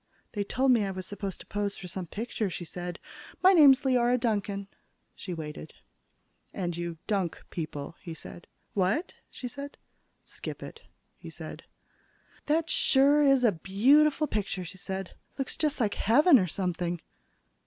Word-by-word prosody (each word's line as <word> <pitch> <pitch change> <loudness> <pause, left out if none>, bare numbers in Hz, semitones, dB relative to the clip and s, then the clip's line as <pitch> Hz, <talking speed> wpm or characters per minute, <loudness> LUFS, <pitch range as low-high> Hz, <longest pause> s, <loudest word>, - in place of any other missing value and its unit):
"They 205 -2 -2
told 260 +6 +2
me 235 -4 +4
I 195 - -1
was 185 -1 -5
supposed 200 -1 -5
to - - -12
pose 205 -1 -3
for 185 - -8
some 180 0 -5
picture," 220 +1 -3
she 175 0 -6
said. 175 +1 -6 0.5
"My 375 +1 +8
name's 285 -5 +8
Leora 250 -2 +3
Duncan." 205 -4 -1 0.5
She 185 - -8
waited. 155 -2 -6 0.8
"And 175 -3 -2
you 170 -1 -4
dunk 195 -6 -1
people," 155 -2 -5
he 170 -4 -7
said. 175 - -11 0.3
"What?" 200 - 0 0.2
she 250 - -7
said. 280 +3 -8 0.5
"Skip - - -7
it," - - -10 0.4
he - - -9
said. - - -9 0.8
"That 320 +2 +2
sure 285 -1 +4
is 275 -3 +5
a 230 - +5
beautiful 275 - +3
picture," 200 -7 -3
she 185 +3 -9
said. 190 0 -5 0.2
"Looks 270 -2 -3
just 300 -2 0
like 215 -4 +1
heaven 275 - +5
or 185 - +1
something." 175 -1 -2
205 Hz, 155 wpm, -29 LUFS, 180-265 Hz, 0.8 s, My